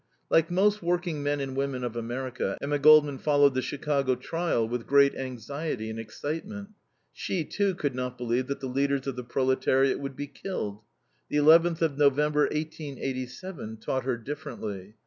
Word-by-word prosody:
Like 165 0 +4
most 205 +4 +2
working 175 -3 -1
men 145 0 0
and 135 -1 -4
women 135 -2 -2
of 120 -1 -3
America, 120 +2 -3
Emma 145 +1 -1
Goldman 150 -2 +6
followed 145 -2 +4
the 130 - 0
Chicago 140 -2 0
trial 165 -7 -1
with 120 0 -4
great 140 0 +5
anxiety 130 -1 -4
and 110 - -6
excitement. 165 - -5 0.4
She, 175 -5 -2
too, 200 +1 0
could 145 -5 -1
not 125 0 -4
believe 125 +1 -1
that 140 - -4
the 135 - -3
leaders 140 +1 0
of 135 -2 -3
the 125 - -5
proletariat 130 +2 +2
would 140 -1 -5
be 145 - -4
killed. 135 - -5 0.5
The - - 0
11th 165 +3 +5
of 150 -3 0
November, 150 +1 +4
1887, 140 - -5
taught 130 +3 -2
her 130 -2 0
differently. 115 -7 -6
140 Hz, 165 wpm, -28 LUFS, 125-155 Hz, 0.5 s, Goldman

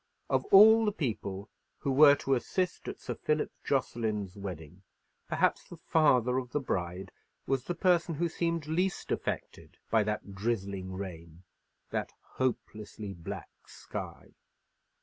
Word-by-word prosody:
Of - - +2
all 220 +3 +8
the 210 - +2
people 105 - -3 0.3
who 140 - -2
were 140 +1 +8
to 135 -1 -1
assist 180 +8 -1
at - - -5
Sir - - -4
Philip 150 0 -1
Jocelyn's 110 -7 -1
wedding, 90 -3 -8 0.5
perhaps - - +1
the 175 - -9
father 130 -7 +3
of 125 -1 -8
the 145 - +2
bride 95 -6 -3 0.3
was 135 -2 0
the 175 - -2
person 170 -2 +2
who 170 +4 0
seemed 170 -1 -1
least 175 +5 -1
affected - - -4
by 110 0 +5
that 105 -1 -3
drizzling 100 -3 -2
rain, 85 -3 -8 0.5
that - - -2
hopelessly 110 -5 -4
black 85 -3 -7 0.2
sky. - - -8
125 Hz, 135 wpm, -30 LUFS, 95-160 Hz, 0.5 s, all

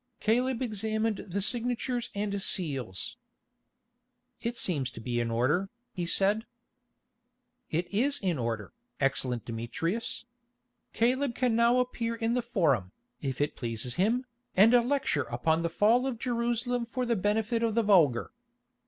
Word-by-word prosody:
Caleb 250 +3 +1
examined 220 -1 -1
the 195 +2 -1
signatures 245 +1 -1
and 200 -1 -2
seals. 135 - -2 1.2
"It 235 0 -2
seems 145 - 0
to 120 - -10
be 120 +1 -2
in 120 -1 0
order," 140 +12 +1 0.2
he 175 -2 -3
said. 205 +6 +2 1.2
"It 170 +3 0
is 275 +7 +2
in 180 -7 -1
order, 115 - -3 0.3
excellent 130 -3 0
Demetrius. 165 - -2 0.7
Caleb 250 +2 +1
can 250 -3 +1
now 235 +2 +4
appear 240 -2 -1
in 230 0 0
the 250 - +1
Forum, 160 - +1 0.3
if 135 -3 -3
it 145 - 0
pleases 120 0 -2
him, 230 +8 +1 0.3
and 215 +5 +7 0.2
lecture 265 - +1
upon 160 +7 +1
the 170 - 0
fall 225 +9 +3
of 255 -3 -2
Jerusalem 240 0 -1
for 250 +2 -3
the 235 -1 +1
benefit 220 +3 0
of 225 -2 +1
the 230 - +3
vulgar. 165 - +4
210 Hz, 140 wpm, -29 LUFS, 145-235 Hz, 1.2 s, and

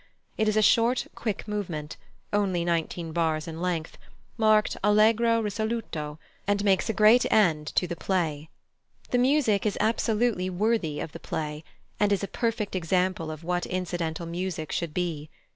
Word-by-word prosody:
It 215 - +1
is 215 0 +2
a 215 - +4
short, 235 +4 +3
quick 215 -2 -4
movement, 175 -8 -4 0.4
only 190 -4 +1
nineteen 170 0 -1
bars 160 -1 0
in 165 0 -6
length, 170 -3 -3 0.4
marked 215 -1 +3
allegro 225 +2 +4
risoluto, 210 -8 -3 0.3
and 205 0 +1
makes 195 0 +2
a - - +1
great 215 +4 +5
end 160 -8 +3
to - - +3
the 170 -1 -4
play. 160 -5 -2 0.6
The 245 - +3
music 250 -6 +3
is 210 -2 -1
absolutely 220 -3 +1
worthy 185 -5 0
of 160 - -5
the - - -9
play, 150 0 -4 0.4
and 205 -1 +3
is 200 0 +1
a - - -1
perfect 225 -4 -2
example 180 -1 0
of 155 +1 -7
what 175 +1 -1
incidental 175 -2 -3
music 170 -2 -4
should 165 -3 -3
be. 160 -4 -2
185 Hz, 160 wpm, -27 LUFS, 165-215 Hz, 0.6 s, great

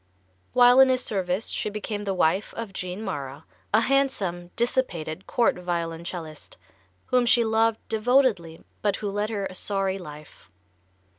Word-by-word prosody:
While 245 +1 +7
in 265 0 +8
his 255 -1 +1
service 190 0 -2
she - - -2
became 210 0 -5
the 195 - -1
wife 180 +4 +1
of 225 -4 -6
Jean 185 +3 -5
Mara, 145 -6 -5 0.3
a 220 - +4
handsome, 215 -10 0
dissipated 190 -9 -1
court 235 -5 +2
violoncellist, 170 -2 -5 0.5
whom 250 -1 +2
she 235 0 +4
loved 220 0 +2
devotedly, 220 -8 +1 0.2
but 205 -2 +1
who 205 -2 -4
led 205 +1 -1
her 205 -3 -2
a 185 - -6
sorry 195 0 -1
life. 150 -3 -12
200 Hz, 145 wpm, -25 LUFS, 175-230 Hz, 0.5 s, in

